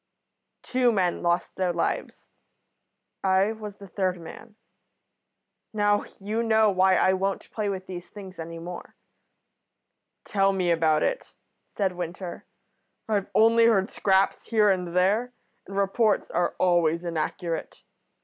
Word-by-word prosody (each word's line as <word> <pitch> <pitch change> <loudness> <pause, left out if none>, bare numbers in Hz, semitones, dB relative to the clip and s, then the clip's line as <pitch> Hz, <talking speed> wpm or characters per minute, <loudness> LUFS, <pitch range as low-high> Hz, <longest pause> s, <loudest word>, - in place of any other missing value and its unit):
"Two 250 -1 +2
men 185 -5 0
lost 175 0 0
their 185 -1 +1
lives. 170 -1 -3 1.0
I 190 +2 +3
was 215 -2 -8
the 200 - -12
third 185 -1 -1
man. 190 +6 -11 1.2
Now, 205 -1 +2
you 210 +3 -2
know 220 -2 +3
why 190 0 +4
I 185 - +3
won't 195 +1 -2
play 210 -2 -2
with 190 -1 -4
these 180 -2 -8
things 190 -3 -11
any 165 +1 -6
more." 175 +1 -8 1.3
"Tell 195 -1 +1
me 180 -2 +1
about 160 -2 +2
it," - - -3 0.3
said 195 -2 -1
Winter. 175 0 -6 0.6
"I've 205 -3 -1
only 230 +1 +5
heard 200 -4 +2
scraps 195 0 +1
here 215 -3 +4
and 180 -2 -2
there, 210 +7 +2 0.3
and 195 - -7
reports 200 +2 +1
are 175 +1 0
always 170 -2 +2
inaccurate. 170 +1 -4
190 Hz, 130 wpm, -26 LUFS, 175-210 Hz, 1.3 s, only